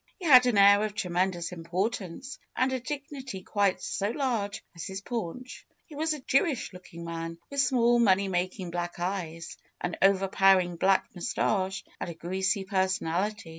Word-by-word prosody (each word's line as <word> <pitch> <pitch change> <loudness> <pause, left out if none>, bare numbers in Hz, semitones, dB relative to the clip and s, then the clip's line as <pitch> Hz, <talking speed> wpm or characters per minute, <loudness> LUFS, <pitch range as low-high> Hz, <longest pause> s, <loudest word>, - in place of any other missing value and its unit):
He 370 - -8
had 255 -5 +8
an 235 -4 +2
air 200 +1 +7
of 215 -1 -3
tremendous 180 -3 -1
importance 185 +7 -4 0.2
and 260 +1 +1
a 260 - -1
dignity 265 -6 -6
quite 200 -2 0
so 200 +1 -1
large 230 -6 -2
as 170 - -6
his 190 -1 -5
paunch. 235 +3 -6 0.2
He 315 - -14
was 315 +2 0
a - - -8
J 265 +1 +4
ewish 275 - -3
looking 170 -2 -10
man, 165 0 -5
with 280 0 +2
small, 240 -3 +3
money 200 -3 +4
making 185 -1 -2
black 175 0 -3
eyes, 170 -3 -4 0.2
an 175 -1 -3
overpowering 195 -2 +4
black 190 +2 +3
mus 175 -2 -4
tache, 190 -2 0 0.2
and - - -4
a 170 - -7
greasy 190 +4 -1
personality. 190 0 -1
195 Hz, 170 wpm, -28 LUFS, 180-235 Hz, 0.2 s, had